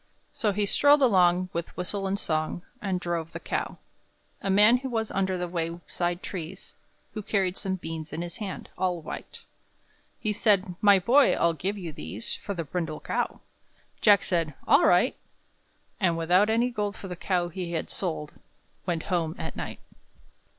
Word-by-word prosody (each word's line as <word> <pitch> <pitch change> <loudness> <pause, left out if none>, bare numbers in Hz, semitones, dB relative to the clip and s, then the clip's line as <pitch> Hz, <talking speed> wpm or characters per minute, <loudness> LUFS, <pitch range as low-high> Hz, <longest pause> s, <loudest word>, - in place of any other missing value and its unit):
So 215 -4 +1
he 205 +1 0
strolled 285 +7 +5
along, 185 -5 +4
with 170 0 -4
whistle 195 +2 -2
and 195 +1 0
song, 155 -1 -1 0.2
And 190 -4 -1
drove 170 -2 -3
the - - -5
cow. - - -3 0.6
A 195 - -2
man 210 +6 +6
was 225 -4 -2
under 190 -1 0
the 180 0 -2
wayside 175 +1 -3
trees, 180 0 -7 0.4
Who 215 - -4
carried 195 -3 0
some 190 -2 -1
beans 160 -3 -6
in 170 - -3
his 175 -1 -6
hand 200 -4 -6
all 180 -2 +1
white. 155 - -8 0.8
He 215 -2 0
said, 200 -3 +2
"My 205 -1 +7
boy, 245 +10 +5
I'll 170 0 +2
give 190 +6 -3
you 175 -4 -5
these 95 - -6
For 200 - -5
the 170 - -2
brindle 160 0 -3
cow." - - -2 0.6
Jack 205 -3 +6
said, 165 -5 0
"All - - +6
right." 180 +8 +4 0.8
And, 170 -4 +2
without 180 +6 +4
any 235 +3 +2
gold 210 -2 -2
for 195 - -8
the 180 - -5
cow 175 -1 0
he 175 0 -5
had 160 - -3
sold, 160 -5 -3 0.5
Went 170 -3 -1
home 165 -2 0
at - - -5
night. - - -6
185 Hz, 170 wpm, -27 LUFS, 170-205 Hz, 0.8 s, My